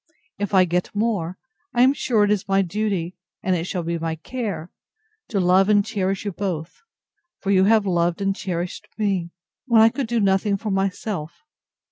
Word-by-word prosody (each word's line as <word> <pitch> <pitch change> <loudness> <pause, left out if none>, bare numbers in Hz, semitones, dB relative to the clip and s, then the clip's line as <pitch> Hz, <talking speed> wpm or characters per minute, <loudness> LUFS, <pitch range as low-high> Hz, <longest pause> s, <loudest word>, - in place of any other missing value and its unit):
If 205 -1 -1
I 185 -1 +6
get 180 +3 -2
more, 200 -5 -1 0.4
I 240 - +5
am 265 +2 +5
sure 240 -6 +1
it 205 - +2
is 205 -3 0
my 195 0 +3
duty, 190 -2 -2 0.3
and 185 -1 +2
it 165 -1 -2
shall 180 -1 -3
be 170 0 -2
my 165 0 -2
care, 200 -1 -5 0.6
to 205 - -1
love 185 +2 +4
and 205 -1 +4
cherish 195 -2 -2
you 205 - -1
both; 175 -4 -4 0.6
for 195 - -1
you 190 -1 +5
have 215 0 +4
loved 175 -2 +1
and 195 -1 0
cherished 175 -2 -4
me, 195 -5 0 0.4
when 235 -3 +5
I 220 +1 +7
could 265 +1 -3
do 235 0 0
nothing 200 0 +2
for 215 +1 -4
myself. 195 - -3
195 Hz, 185 wpm, -23 LUFS, 180-210 Hz, 0.6 s, I